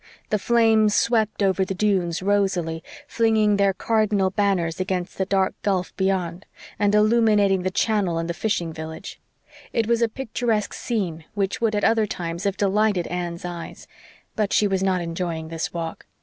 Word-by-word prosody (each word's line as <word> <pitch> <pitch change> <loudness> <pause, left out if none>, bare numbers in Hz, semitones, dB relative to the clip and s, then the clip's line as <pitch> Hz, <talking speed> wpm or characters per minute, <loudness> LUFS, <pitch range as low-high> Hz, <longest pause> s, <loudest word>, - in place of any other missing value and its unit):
The 210 - +2
flames 220 -2 +3
swept 220 -3 +1
over 190 0 +2
the 190 0 -3
dunes 185 -3 0
rosily, 190 -5 0 0.3
flinging 220 -3 +2
their 200 -1 +3
cardinal 210 -2 +1
banners 190 -5 0
against 185 -1 -3
the 190 - 0
dark 190 -1 +1
gulf 190 -3 -1
beyond, 190 -2 -1 0.3
and 205 0 +3
illuminating 210 -3 +4
the 185 - -1
channel 190 -3 0
and 165 0 -2
the 170 - -2
fishing 175 -4 -2
village. 160 0 -8 0.5
It 230 - +1
was 235 +1 +1
a 230 - +3
picturesque 230 -3 -2
scene 180 -9 -3
which 200 +1 -1
would 220 -2 +1
at 205 - -1
other 225 -1 +3
times 170 -1 -4
have 200 -1 0
delighted 200 -2 +2
Anne's 175 -1 -4
eyes; 175 -1 -7 0.5
but 210 -2 0
she 210 - +4
was 190 -1 0
not 190 -2 +1
enjoying 165 -1 -4
this 165 0 -3
walk. 165 -1 -6
195 Hz, 165 wpm, -23 LUFS, 175-215 Hz, 0.5 s, illuminating